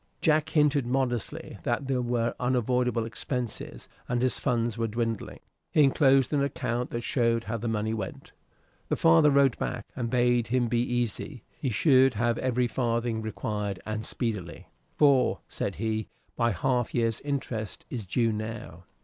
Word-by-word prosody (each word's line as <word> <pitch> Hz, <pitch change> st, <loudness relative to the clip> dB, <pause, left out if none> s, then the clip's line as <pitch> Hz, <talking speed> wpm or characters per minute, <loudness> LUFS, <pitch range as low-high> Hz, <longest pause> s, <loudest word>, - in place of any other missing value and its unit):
Jack 155 Hz, 0 st, +2 dB
hinted 150 Hz, -5 st, +2 dB
modestly 125 Hz, -3 st, -2 dB
that 135 Hz, -, -1 dB
there 130 Hz, -2 st, +1 dB
were 120 Hz, -1 st, 0 dB
unavoidable 125 Hz, -1 st, +1 dB
expenses, 120 Hz, +1 st, -5 dB, 0.2 s
and 120 Hz, 0 st, +1 dB
his 130 Hz, +1 st, +1 dB
funds 120 Hz, -4 st, 0 dB
were 115 Hz, 0 st, -1 dB
dwindling. 115 Hz, 0 st, -3 dB, 0.3 s
He 150 Hz, -, +4 dB
enclosed 135 Hz, 0 st, +4 dB
an 145 Hz, -, +2 dB
account 125 Hz, -3 st, -2 dB
that 120 Hz, -, -3 dB
showed 115 Hz, -2 st, +1 dB
how 115 Hz, -, -3 dB
the 115 Hz, +2 st, -4 dB
money 110 Hz, 0 st, -1 dB
went. 105 Hz, -4 st, -6 dB, 0.6 s
The -, -, +2 dB
father 80 Hz, -, +5 dB
wrote 140 Hz, -3 st, +3 dB
back 120 Hz, -3 st, -3 dB
and 120 Hz, -2 st, -2 dB
bade 120 Hz, -1 st, +2 dB
him 120 Hz, +1 st, +1 dB
be 120 Hz, 0 st, +1 dB
easy; 120 Hz, +1 st, -2 dB
he 135 Hz, -, -2 dB
should 130 Hz, +1 st, +4 dB
have 120 Hz, +2 st, +1 dB
every 125 Hz, -1 st, +1 dB
farthing 115 Hz, -1 st, -1 dB
required, 105 Hz, -2 st, -3 dB
and 110 Hz, 0 st, -3 dB
speedily. 105 Hz, -9 st, -3 dB, 0.3 s
"For," 140 Hz, -4 st, +4 dB
said -, -, -3 dB
he, 110 Hz, +1 st, -2 dB, 0.3 s
"my 115 Hz, -1 st, +2 dB
half 125 Hz, 0 st, 0 dB
year's 115 Hz, -2 st, 0 dB
interest 120 Hz, -, -4 dB
is 120 Hz, -4 st, -3 dB
due 115 Hz, +4 st, +1 dB
now." 110 Hz, -5 st, -6 dB
120 Hz, 160 wpm, -28 LUFS, 110-130 Hz, 0.6 s, father